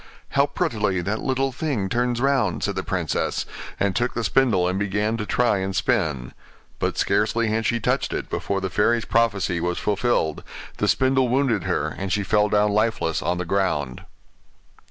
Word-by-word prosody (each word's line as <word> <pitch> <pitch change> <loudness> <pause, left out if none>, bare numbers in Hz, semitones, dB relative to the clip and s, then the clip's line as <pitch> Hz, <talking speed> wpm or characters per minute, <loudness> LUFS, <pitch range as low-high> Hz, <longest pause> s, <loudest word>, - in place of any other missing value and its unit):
'How - - +3
prettily 105 -5 -1
that 105 +5 -2
little 135 0 0
thing 130 -7 -2
turns 120 +3 0
round!' 130 - +1
said - - 0
the - - -1
princess, - - -2 0.3
and 100 -2 +1
took 120 +1 0
the 115 - -1
spindle 110 -8 +2
and 95 +1 -1
began 105 +2 0
to 105 -1 -4
try 120 -1 +2
and 95 0 -3
spin. 80 - 0 0.5
But - - -1
scarcely 110 +3 +1
had 110 0 0
she 115 - +1
touched - - 0
it, - - -3
before 100 -1 -2
the 95 -1 -3
fairy's 115 +1 +2
prophecy 100 -6 +1
was 90 0 -1
fulfilled; 100 -7 0 0.3
the - - 0
spindle 130 0 +3
wounded 125 -6 +1
her, - - 0
and 95 -1 -5
she 100 +3 +1
fell 105 +1 +2
down 105 0 +3
lifeless 105 -6 0
on 85 +3 -1
the 90 - -3
ground. 85 -9 -1
105 Hz, 175 wpm, -23 LUFS, 95-120 Hz, 0.5 s, How